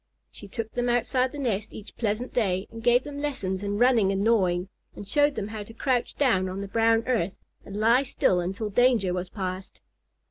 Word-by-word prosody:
She 205 Hz, -, -11 dB
took 225 Hz, +3 st, -5 dB
them 245 Hz, 0 st, -1 dB
outside 250 Hz, +2 st, +1 dB
the -, -, -8 dB
nest 225 Hz, -6 st, -2 dB
each 215 Hz, -, -11 dB
pleasant 225 Hz, +2 st, -2 dB
day 195 Hz, -5 st, 0 dB
and 225 Hz, -, -8 dB
gave 240 Hz, +2 st, +4 dB
them 285 Hz, -1 st, -7 dB
lessons 195 Hz, -11 st, -2 dB
in 205 Hz, 0 st, -2 dB
running 235 Hz, -4 st, +4 dB
and 195 Hz, 0 st, 0 dB
gnawing, 185 Hz, -5 st, +2 dB, 0.3 s
and 205 Hz, -, -9 dB
showed 290 Hz, +2 st, +2 dB
them 205 Hz, 0 st, -4 dB
how 215 Hz, -1 st, -6 dB
to 225 Hz, +2 st, -11 dB
crouch 250 Hz, -1 st, 0 dB
down 190 Hz, -10 st, +2 dB
on 190 Hz, +2 st, -5 dB
the 200 Hz, -, -5 dB
brown 225 Hz, +2 st, +2 dB
earth 220 Hz, -8 st, 0 dB, 0.3 s
and 200 Hz, -, -8 dB
lie 230 Hz, +4 st, +4 dB
still 220 Hz, -8 st, +1 dB
until 195 Hz, +4 st, -3 dB
danger 235 Hz, -5 st, +3 dB
was 180 Hz, 0 st, -3 dB
past. 185 Hz, -1 st, -5 dB
220 Hz, 205 wpm, -26 LUFS, 195-245 Hz, 0.3 s, gave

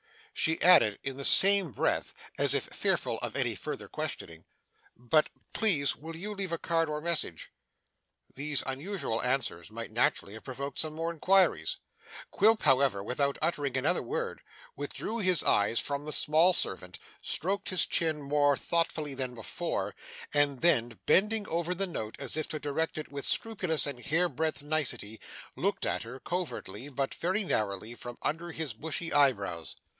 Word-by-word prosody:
She 160 Hz, 0 st, +2 dB
added 110 Hz, -, +7 dB
in 135 Hz, -1 st, -4 dB
the 140 Hz, -, -3 dB
same 195 Hz, -4 st, +6 dB
breath, -, -, -1 dB, 0.2 s
as -, -, +6 dB
if -, -, +1 dB
fearful -, -, -1 dB
of -, -, -4 dB
any -, -, +1 dB
further -, -, -5 dB
questioning, 80 Hz, -1 st, -5 dB, 0.5 s
'But 125 Hz, +6 st, +2 dB, 0.2 s
please 165 Hz, -11 st, +4 dB
will 160 Hz, +2 st, -9 dB
you 205 Hz, +6 st, -5 dB
leave 195 Hz, -3 st, -4 dB
a 170 Hz, -, -1 dB
card 165 Hz, -1 st, 0 dB
or 150 Hz, 0 st, -2 dB
message?' 155 Hz, -, -2 dB, 0.8 s
These 145 Hz, +1 st, -1 dB
unusual 135 Hz, -, -2 dB
answers 125 Hz, -10 st, -1 dB
might 115 Hz, +1 st, -7 dB
naturally 110 Hz, -3 st, 0 dB
have 110 Hz, -, -10 dB
provoked 140 Hz, +2 st, -6 dB
some 155 Hz, -1 st, -1 dB
more 165 Hz, +1 st, -2 dB
inquiries. 170 Hz, -, +2 dB, 0.5 s
Quilp, 215 Hz, +2 st, +4 dB
however, 135 Hz, -8 st, +3 dB
without 140 Hz, +5 st, -1 dB
uttering 145 Hz, -6 st, 0 dB
another 145 Hz, +7 st, +1 dB
word, 470 Hz, +3 st, -4 dB, 0.3 s
withdrew 230 Hz, +2 st, -4 dB
his 185 Hz, -6 st, +4 dB
eyes 105 Hz, +3 st, +3 dB
from 140 Hz, 0 st, -2 dB
the 150 Hz, -, -3 dB
small 165 Hz, +4 st, +4 dB
servant, 90 Hz, -1 st, -1 dB, 0.2 s
stroked 195 Hz, +4 st, -1 dB
his 185 Hz, -, +3 dB
chin 155 Hz, -3 st, 0 dB
more 145 Hz, 0 st, +3 dB
thoughtfully 160 Hz, -3 st, -1 dB
than 130 Hz, -2 st, -4 dB
before, 115 Hz, -, -3 dB, 0.4 s
and 145 Hz, -3 st, +2 dB
then, 120 Hz, -9 st, +2 dB
bending 210 Hz, +2 st, +3 dB
over 170 Hz, +2 st, -1 dB
the 195 Hz, +2 st, 0 dB
note 110 Hz, -, -5 dB
as 140 Hz, -3 st, -4 dB
if 155 Hz, -1 st, -2 dB
to 155 Hz, -, -3 dB
direct 150 Hz, +3 st, -2 dB
it 155 Hz, -, -6 dB
with 140 Hz, -1 st, -4 dB
scrupulous 185 Hz, -8 st, +1 dB
and 140 Hz, -4 st, -5 dB
hair 175 Hz, +3 st, +2 dB
breadth 160 Hz, -4 st, -2 dB
nicety, 145 Hz, -8 st, -1 dB, 0.4 s
looked -, -, -1 dB
at -, -, -1 dB
her, 125 Hz, +3 st, -8 dB
covertly 175 Hz, -5 st, -4 dB
but 135 Hz, -1 st, -2 dB
very 190 Hz, +5 st, -1 dB
narrowly, 105 Hz, -, -1 dB
from 120 Hz, 0 st, -9 dB
under 170 Hz, +3 st, -2 dB
his 160 Hz, -6 st, -3 dB
bushy 160 Hz, +7 st, -4 dB
eyebrows. 100 Hz, -, +1 dB
150 Hz, 160 wpm, -30 LUFS, 130-170 Hz, 0.8 s, added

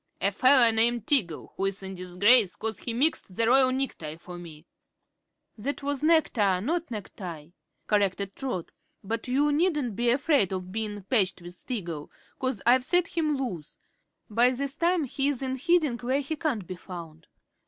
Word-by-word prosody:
"A 200 Hz, -, +2 dB
feller 255 Hz, +2 st, +5 dB
named 230 Hz, 0 st, +2 dB
Tiggle, 200 Hz, -, +1 dB
who's 195 Hz, 0 st, -2 dB
in 190 Hz, 0 st, -5 dB
disgrace 185 Hz, +4 st, +3 dB
'cause 220 Hz, -2 st, -3 dB
he 235 Hz, -, -3 dB
mixed 240 Hz, -, 0 dB
the 230 Hz, -, +2 dB
royal 255 Hz, +2 st, +5 dB
necktie 255 Hz, -, -3 dB
for 175 Hz, +2 st, -11 dB
me." 165 Hz, -3 st, -11 dB, 0.9 s
"That 280 Hz, +6 st, -4 dB
was 285 Hz, -1 st, -2 dB
nectar 240 Hz, -, +2 dB
not 325 Hz, -, -2 dB
necktie," 180 Hz, -8 st, -8 dB, 0.4 s
corrected 200 Hz, -1 st, 0 dB
Trot. 250 Hz, -11 st, -4 dB, 0.3 s
"But 225 Hz, +4 st, -4 dB
you 285 Hz, +4 st, +2 dB
needn't 295 Hz, -, 0 dB
be 240 Hz, +3 st, +2 dB
'fraid 280 Hz, -, +2 dB
of 185 Hz, -1 st, -5 dB
bein' 210 Hz, -1 st, -3 dB
patched 190 Hz, -5 st, +1 dB
with 175 Hz, 0 st, -9 dB
Tiggle, 170 Hz, -, -5 dB, 0.3 s
'cause 255 Hz, -5 st, -2 dB
I've 250 Hz, +2 st, +5 dB
set 355 Hz, +4 st, +2 dB
him 305 Hz, -3 st, 0 dB
loose. 185 Hz, -, -5 dB, 0.5 s
By 235 Hz, +3 st, +4 dB
this 275 Hz, +2 st, -2 dB
time 345 Hz, -1 st, +1 dB
he's 275 Hz, 0 st, -1 dB
in 260 Hz, 0 st, -2 dB
hiding, 310 Hz, -5 st, +2 dB
where 260 Hz, +3 st, 0 dB
he 285 Hz, +3 st, -4 dB
can't 285 Hz, -, -2 dB
be 185 Hz, 0 st, -7 dB
found." 165 Hz, -4 st, -10 dB
230 Hz, 165 wpm, -27 LUFS, 185-275 Hz, 0.9 s, feller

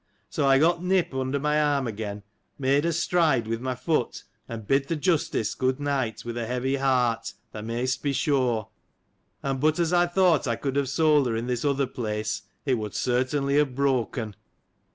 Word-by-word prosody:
So, 145 Hz, -3 st, +1 dB
I 135 Hz, 0 st, +6 dB
got 170 Hz, +4 st, +2 dB
Nip 185 Hz, -4 st, +1 dB
under 130 Hz, +1 st, -1 dB
my 150 Hz, +1 st, +2 dB
arm 145 Hz, -3 st, +1 dB
again, 105 Hz, -2 st, -5 dB, 0.3 s
made 140 Hz, +2 st, +2 dB
a 170 Hz, -, +2 dB
stride 160 Hz, -7 st, +2 dB
with 115 Hz, +1 st, -3 dB
my 130 Hz, 0 st, -2 dB
foot, 125 Hz, 0 st, -1 dB, 0.3 s
and 115 Hz, -2 st, -6 dB
bid 135 Hz, +4 st, +2 dB
th' 165 Hz, 0 st, -2 dB
Justice 150 Hz, -, +1 dB
607 -, -, -9 dB
good 130 Hz, +1 st, 0 dB
night, 135 Hz, -7 st, -2 dB
with 120 Hz, 0 st, -4 dB
a 115 Hz, -, -3 dB
heavy 125 Hz, +3 st, -1 dB
heart, 125 Hz, -4 st, +1 dB, 0.2 s
thou 105 Hz, -, -7 dB
mayst 120 Hz, +3 st, -2 dB
be 145 Hz, -, 0 dB
sure: 130 Hz, -7 st, 0 dB, 0.7 s
and 135 Hz, -1 st, -1 dB
but, 155 Hz, +2 st, +2 dB
as 170 Hz, 0 st, +1 dB
I 175 Hz, 0 st, +4 dB
thought 175 Hz, -5 st, +3 dB
I 115 Hz, -, +1 dB
could 135 Hz, +3 st, -3 dB
have 140 Hz, -2 st, +1 dB
sold 150 Hz, -2 st, +3 dB
her 115 Hz, -, -1 dB
in 115 Hz, +1 st, -2 dB
this 125 Hz, -1 st, -2 dB
other 140 Hz, -1 st, +1 dB
place, 110 Hz, -4 st, -3 dB, 0.2 s
it 130 Hz, -4 st, +1 dB
would 105 Hz, -2 st, -5 dB
certainly 135 Hz, +3 st, +1 dB
have 145 Hz, -4 st, +2 dB
broken. 125 Hz, -5 st, 0 dB
135 Hz, 195 wpm, -26 LUFS, 120-150 Hz, 0.7 s, I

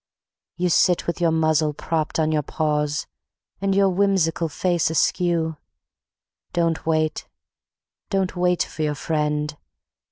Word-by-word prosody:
You 180 Hz, 0 st, +1 dB
sit 175 Hz, +1 st, +3 dB
with 170 Hz, +1 st, -3 dB
your 170 Hz, -, +4 dB
muzzle 155 Hz, -1 st, +2 dB
propped 160 Hz, 0 st, -2 dB
on 155 Hz, 0 st, +2 dB
your 155 Hz, -1 st, +2 dB
paws, 150 Hz, 0 st, -1 dB, 0.6 s
And 195 Hz, -1 st, +1 dB
your 195 Hz, 0 st, +4 dB
whimsical 185 Hz, -4 st, +1 dB
face 175 Hz, +1 st, 0 dB
askew. 165 Hz, 0 st, +1 dB, 1.0 s
Don't 165 Hz, -2 st, 0 dB
wait, 155 Hz, -1 st, 0 dB, 0.8 s
don't 190 Hz, -2 st, 0 dB
wait 180 Hz, -1 st, +2 dB
for 155 Hz, -, -8 dB
your 150 Hz, -1 st, 0 dB
friend 150 Hz, 0 st, -1 dB
160 Hz, 125 wpm, -23 LUFS, 155-180 Hz, 1.0 s, your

